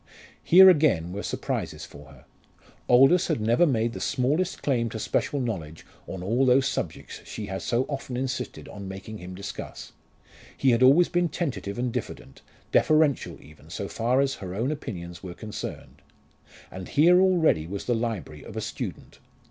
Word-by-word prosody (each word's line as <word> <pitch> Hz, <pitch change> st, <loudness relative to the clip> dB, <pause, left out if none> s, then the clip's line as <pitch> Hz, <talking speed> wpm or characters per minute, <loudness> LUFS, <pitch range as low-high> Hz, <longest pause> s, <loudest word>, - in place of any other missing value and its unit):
Here 190 Hz, +3 st, +8 dB
again 145 Hz, -, +4 dB
were 100 Hz, -, -4 dB
surprises -, -, -4 dB
for 75 Hz, 0 st, -14 dB
her. 70 Hz, -2 st, -17 dB, 0.6 s
Aldous 135 Hz, +9 st, +6 dB
had 160 Hz, -6 st, 0 dB
never 115 Hz, +10 st, +3 dB
made 115 Hz, -4 st, 0 dB
the -, -, -6 dB
smallest 145 Hz, +8 st, -1 dB
claim 120 Hz, -5 st, +1 dB
to 110 Hz, -, -6 dB
special 140 Hz, +5 st, -1 dB
knowledge 85 Hz, -, -5 dB, 0.2 s
on 95 Hz, -2 st, -6 dB
all 115 Hz, +7 st, +1 dB
those 130 Hz, +1 st, +4 dB
subjects 130 Hz, -, -5 dB
she 110 Hz, -, -7 dB
had 95 Hz, -1 st, -5 dB
so 120 Hz, +2 st, 0 dB
often 135 Hz, -3 st, -5 dB
insisted 130 Hz, 0 st, -4 dB
on 100 Hz, -1 st, -8 dB
making 95 Hz, +3 st, -8 dB
him 90 Hz, +1 st, -9 dB
discuss. 100 Hz, +1 st, -8 dB, 0.7 s
He 135 Hz, -, +3 dB
had 115 Hz, -, +3 dB
been 130 Hz, -, +7 dB
always 170 Hz, +6 st, +5 dB
tentative 145 Hz, -, -2 dB
and 120 Hz, -1 st, -2 dB
diffident, -, -, -6 dB, 0.3 s
deferential 155 Hz, -3 st, +2 dB
even 75 Hz, 0 st, -17 dB
so -, -, -5 dB
far 125 Hz, +4 st, +1 dB
as 135 Hz, -1 st, +1 dB
her 95 Hz, -1 st, -6 dB
own 120 Hz, +7 st, -1 dB
opinions 85 Hz, -, -7 dB
were 90 Hz, -2 st, -8 dB
concerned. 105 Hz, +1 st, -8 dB, 0.7 s
And 95 Hz, -1 st, -8 dB
here 175 Hz, +5 st, +5 dB
already 165 Hz, -, +3 dB
was 100 Hz, +2 st, -5 dB
the 125 Hz, -, +1 dB
library 110 Hz, -10 st, -3 dB
of -, -, -10 dB
a -, -, -2 dB
student. -, -, -6 dB
120 Hz, 170 wpm, -26 LUFS, 95-140 Hz, 0.7 s, Here